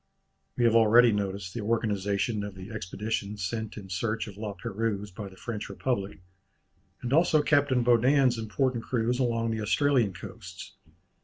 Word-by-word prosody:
We - - +1
have 115 - +4
already 115 +1 +6
noticed 100 -2 -3
the 115 - -4
organization 105 -1 0
of 100 -1 -6
the 95 +3 -9
Expedition 105 0 -4
sent 110 +4 -4
in 100 -2 -8
search 105 +4 -2
of 100 - -9
La 105 -1 -5
Pérouse 105 +1 -3
by 100 +1 -7
the 95 - -15
French 110 -1 -5
Republic, 100 -8 -3 0.8
and 125 +2 -2
also 155 -1 +4
Captain 145 -4 +3
Baudin's 125 +1 +4
important 115 +2 -1
cruise 120 0 0
along 115 -2 0
the 110 -1 -2
Australian 120 -1 +2
coasts. 85 - -10
110 Hz, 155 wpm, -28 LUFS, 100-120 Hz, 0.8 s, already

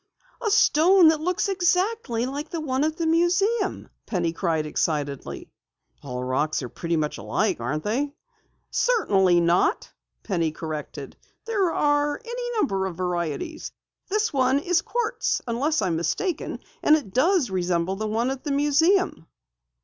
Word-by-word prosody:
"A 440 - 0
stone 365 -3 +5
that 315 -1 +1
looks 360 +4 0
exactly 365 - 0
like 285 +4 -5
the 335 - -4
one 270 -3 -1
at 315 +1 -1
the 335 - -1
museum!" 365 +6 +1 0.2
Penny 175 -5 -1
cried 165 -3 -1
excitedly. 145 - -3 0.5
"All 125 -2 -5
rocks 135 +3 -1
are 125 - -5
pretty 170 +5 -2
much 150 -1 -2
alike, 215 - -1
aren't 140 +6 -3
they?" 270 +7 -1 0.6
"Certainly 195 - +3
not," 175 - +1 0.3
Penny 170 -6 0
corrected. 150 -3 -7 0.3
"There 400 -6 +1
are 290 -1 +1
any 485 0 -4
number 195 - 0
of 175 -3 -7
varieties. 180 - -3 0.4
This 425 0 0
one 260 0 +3
is 335 +3 +1
quartz 475 -1 -1
unless 265 +4 0
I'm 170 -4 0
mistaken 330 - -2 0.2
and 300 - +6
it 255 -12 -4
does 305 - +2
resemble 180 0 0
the 215 +2 -3
one 230 +4 0
at 270 -1 -6
the 290 - -3
museum." 295 - +2
270 Hz, 145 wpm, -24 LUFS, -, 0.6 s, and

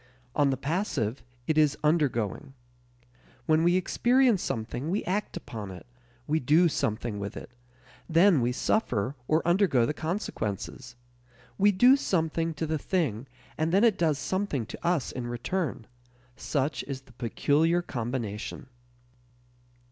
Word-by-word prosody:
On 145 -2 +3
the 135 - 0
passive, 140 - -2 0.2
it 155 +2 +2
is 150 -2 +3
undergoing. 140 - 0 0.9
When 155 +1 +3
we 175 +1 +4
experience 240 +3 +3
something 120 +6 -3
we 195 +4 0
act 205 +3 -2
upon 105 -4 -7
it, 90 -2 -10 0.4
we 155 +3 +1
do 155 +7 +4
something 110 -5 -2
with 100 0 -5
it; - - -9 0.6
then 170 -2 +5
we 120 +1 +1
suffer 125 - 0
or 155 +2 +1
undergo 175 - +3
the 150 - -1
consequences. 130 - -4 0.6
We 205 +1 +5
do 245 +7 +6
something 165 - -1
to 160 - -2
the 155 -1 -1
thing 140 - -1 0.3
and 160 +1 +1
then 195 +4 +4
it 225 -4 +4
does 160 -4 +2
something 185 - -2
to - - -9
us 170 -6 0
in 125 -1 -5
return: 120 +2 -3 0.5
such 145 +1 -1
is 135 -1 -5
the 130 -2 -21
peculiar 150 +8 +1
combination. 120 -3 -4
150 Hz, 140 wpm, -28 LUFS, 120-175 Hz, 0.9 s, do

